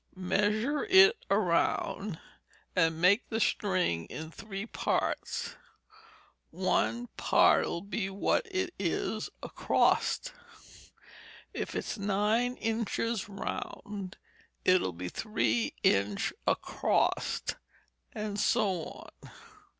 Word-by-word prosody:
Measure 210 +9 +1
it 390 +2 +7
round, 190 -1 +1 0.6
and 165 -3 +2
make 190 +7 +4
the 225 - -1
string 185 - +1
in 160 0 -7
three 200 +2 -6
parts, - - -2 1.0
and - - -15
one 240 +1 +1
part'll 170 - +3
be 200 -1 -3
what 200 - 0
it 375 -2 -2
is 200 +4 -1
acrost. - - +1 1.2
If - - -4
it's - - -3
nine 210 +5 +1
inch 225 -1 -2 0.3
round, 200 -1 -6 0.5
it'll 185 - +4
be 90 +2 -5
three 120 - 0
inch 100 +1 +2
acrost, - - 0 0.5
and 210 -1 -4
so 200 -6 +2
on. - - -10
200 Hz, 95 wpm, -30 LUFS, 180-225 Hz, 1.2 s, it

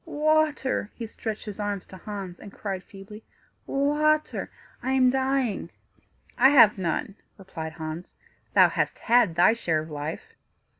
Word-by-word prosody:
"Water!" 305 -7 +1
he 235 - -5
stretched 220 -1 -6
his 210 -1 -7
arms 205 -2 -3
to - - -13
Hans, 190 -2 -7
and 205 - -11
cried 195 -3 -5
feebly, 205 +2 -12 0.4
"Water! 300 +2 +1 0.3
I 260 +2 -1
am 255 -1 +4
dying." 265 -4 0 0.7
"I 265 +2 +8
have 225 -8 +6
none," 185 +2 -2 0.2
replied 165 -5 -7
Hans; 160 +2 -7 0.4
"thou - - +8
hast - - -1
had 235 -7 +3
thy 175 +6 +5
share 170 -9 0
of 155 +1 -10
life." 150 +1 -6
210 Hz, 145 wpm, -26 LUFS, 185-265 Hz, 0.7 s, I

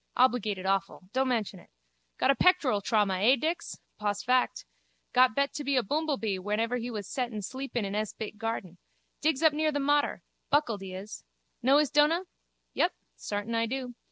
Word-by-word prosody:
Obligated 220 -7 +2
awful. 195 0 -1
Don't 265 +1 +2
mention 220 -6 -1
it. - - -19 0.5
Got 270 - +4
a - - +1
pectoral 290 - +3
trauma, 200 -3 +1
eh, 235 +7 +5
Dix? 330 +5 -3 0.2
Pos 205 -1 -1
fact. 250 +3 +1 0.5
Got 250 -3 +5
bet 280 0 0
be 275 -1 +1
a 250 - +3
boomblebee 270 -7 -1
whenever 220 +5 -1
he 240 0 -4
wus 210 -4 -5
settin 240 -6 -3
sleepin 260 -1 -3
in 195 - -4
hes 215 0 -1
bit 215 -1 -7
garten. 215 -6 -4 0.4
Digs 310 -1 +1
up 315 -2 +6
near 310 +1 +1
the 290 - -1
Mater. 290 +1 +1 0.3
Buckled 240 -9 +1
he 190 -1 -7
is. 200 +3 -8 0.4
Know 265 +3 +5
his 295 -2 +2
dona? 300 +4 +4 0.5
Yup, 350 - +2 0.2
sartin 205 +2 -4
I 230 0 +1
do. 255 0 -4
240 Hz, 180 wpm, -29 LUFS, 205-280 Hz, 0.5 s, up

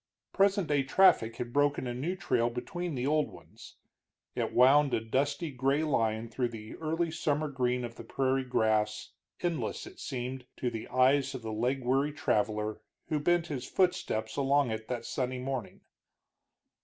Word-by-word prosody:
Present 195 -2 +3
day 145 -2 +3
traffic 135 -6 +4
had 120 0 -5
broken 145 -1 +2
a 120 - -3
new 150 +10 -2
trail 120 -9 +1
between 170 +7 -4
the 125 0 -2
old 150 +1 +2
ones; - - -14 0.6
it - - -2
wound 135 +2 +5
a - - +1
dusty 140 +7 -1
gray 135 +3 +1
line 115 -6 0
through 120 +2 -1
the 110 -2 -9
early 165 +1 -1
summer 155 -2 0
green 125 -3 -1
of 115 0 -9
the - - -8
prairie 135 0 0
grass, 110 -4 0 0.3
endless, 175 -3 -2
it - - -12
seemed, 130 -1 -5
to 125 - -1
the 115 -1 -6
eyes 135 +2 +3
of 125 - -7
the 110 -1 -4
leg 125 +4 0
weary 135 +4 +2
traveler 105 -4 0 0.3
who 155 - +1
bent 175 +2 +2
his 135 -6 -5
footsteps 180 -12 0
along 140 -2 +2
it 110 0 -4
that 120 -2 -4
sunny 130 -1 -2
morning. 130 -3 -4
130 Hz, 165 wpm, -30 LUFS, 120-150 Hz, 0.6 s, wound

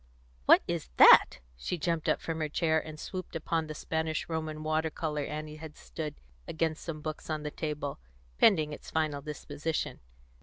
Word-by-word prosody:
What - - +8
is - - -3
that?" - - +8
She 120 - -3
jumped 165 -1 -1
from 165 -1 -3
her 155 -1 -1
chair, 160 +1 +2
and 155 -1 -9
swooped 185 0 -6
upon 165 0 -1
the 155 - -6
Spanish 160 +1 -2
Roman 155 -1 -3
water 155 +1 +1
colour 150 -1 -2
Annie 155 0 -5
had 155 -1 -10
stood 155 -2 -6 0.3
against 160 0 -1
some 155 -3 -5
books 155 +1 -6
on 155 -1 -2
the 150 - -3
table, 150 -3 -4 0.4
pending 155 -8 +5
its - - -9
final 155 -3 0
disposition. 155 +1 -4
155 Hz, 165 wpm, -30 LUFS, 150-160 Hz, 0.4 s, What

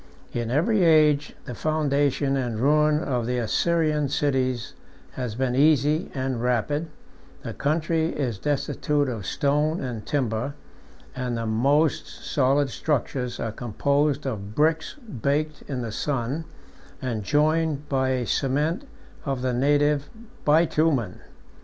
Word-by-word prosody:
In 120 -1 -2
every 180 - +2
age, 150 -3 +4
the 125 - -6
foundation 145 -1 +1
and 120 -5 -2
ruin 150 +3 +3
of 125 -4 -1
the 125 0 0
Assyrian 150 +4 +1
cities 130 -4 0 0.4
has 125 -4 -4
been 130 0 0
easy 150 +3 +3
and 130 -3 -2
rapid: 125 +6 0 0.6
the - - -5
country 160 +2 0
is 125 - -3
destitute 145 +1 0
of 115 -7 -4
stone 150 +3 +1
and 120 -5 -4
timber; 130 0 -1 0.6
and 125 -2 -2
the 115 - -3
most 140 +8 +2
solid 140 0 0
structures 125 -4 -1
27 - - -3
are - - -3
composed 140 +5 0
of 105 -5 -4
bricks 160 +2 +1
baked 155 - -2
in 130 -4 -3
the 115 - -4
sun, 135 +5 -2 0.5
and 120 -5 -3
joined 150 +3 +1
by 130 -1 +1
a 130 -2 0
cement 150 - 0 0.4
of 135 -3 -2
the 130 -1 0
native 145 +2 +2 0.3
bitumen. 150 - +2
140 Hz, 130 wpm, -25 LUFS, 125-150 Hz, 0.6 s, age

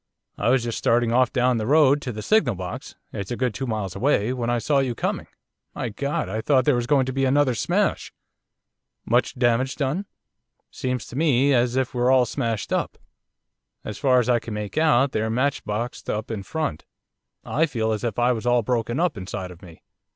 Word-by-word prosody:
I 105 - 0
was 130 -1 +3
just 115 -1 -3
starting 120 0 +2
off 125 +1 +3
down 125 -2 +2
the 110 - -3
road 145 0 +4
to 125 - -4
the 105 -1 -6
signal 170 - +2
box, 90 -1 -7 0.2
it's 100 -2 -5
a 120 - -2
good 125 -3 0
two 135 +5 -4
miles 105 -5 -3
away, 125 -4 +1
when 120 -2 -2
I 120 - +1
saw 140 +4 +1
you 130 -3 -1
coming. - - -2 0.5
My - - -3
God! 140 +7 -2
I 110 - -3
thought 130 0 +2
there 145 - +4
was 120 -1 -1
going 140 -2 +3
to 130 - -4
be 135 +1 0
another 135 0 +3
smash.' - - 0 0.9
'Much - - +1
damage 125 +1 +1
done?' 155 +8 -2 0.6
'Seems 125 -2 -3
to - - -11
me 140 -2 +3
as 120 0 +2
if 130 -1 0
we're 125 0 +1
all 130 -1 +5
smashed 115 -3 -2
up. - - -1 0.9
As 105 - -6
far 130 -3 +3
as 125 - 0
I 120 -1 +3
can 110 -1 -7
make 105 -1 -5
out 145 -4 +3
they're 110 +1 -1
matchboxed 120 -2 -2
up 110 +2 -3
in 110 -3 -3
front. 125 - -3 0.6
I 160 +4 +1
feel 110 -6 -1
as 110 +1 -2
if 115 -4 -2
I 120 +1 +3
was 120 0 -3
all 120 -1 +3
broken 120 +3 -1
up 170 -8 +1
inside 95 -1 -5
of 90 +1 -14
me. 85 -4 -14
125 Hz, 210 wpm, -24 LUFS, 110-135 Hz, 0.9 s, all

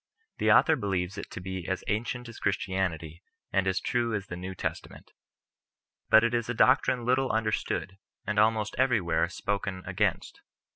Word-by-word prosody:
The - - +3
author 160 - +6
believes 95 -6 -2
it - - -8
to - - -7
bo 95 -1 -5
as 95 - -2
ancient 120 +3 -2
as 115 - -10
Christianity, 90 -5 -2 0.3
and 95 0 +2
as 95 0 +1
true 120 -2 0
as 100 -2 -3
the 90 - -7
New 95 +2 -6
Testa - - -4
ment. - - -15 1.0
But 110 - +7
it 115 0 +1
is 120 -1 -1
a 120 - -1
doctrine 130 -1 +3
little 130 +1 +2
understood, 110 -3 -2 0.3
and 105 0 0
almost 110 0 +2
everywhere 115 -11 +2
spoken 100 -2 -3
against. - - -1
105 Hz, 165 wpm, -28 LUFS, 95-115 Hz, 1.0 s, But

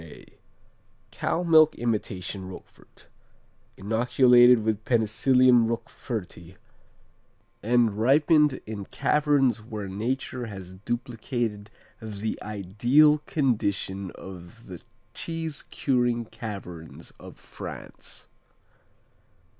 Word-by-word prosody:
A_ 80 -3 -14 0.8
Cow 175 - -2
milk 160 -2 +5
imitation 100 -5 -3
Roquefort, 95 - -14 0.7
inoculated 120 +3 +5
with 110 -1 -1
Penicillium 120 +2 +3
Roqueforti 105 -6 -6 1.1
and 120 -1 +2
ripened 150 +3 +3
in 105 -2 -6
"caverns 140 -4 +1
where 105 -2 -6
nature 120 +4 -3
has 95 -3 -9
duplicated 115 0 -4 0.3
the 110 0 -5
ideal 120 +10 +3
condition 100 - -1
of 95 +5 -11
the 90 -3 -10 0.3
cheese 165 -3 -5
curing 120 -3 0
caverns 95 -8 -9
of - - -12
France." - - -10
115 Hz, 85 wpm, -26 LUFS, 100-130 Hz, 1.1 s, milk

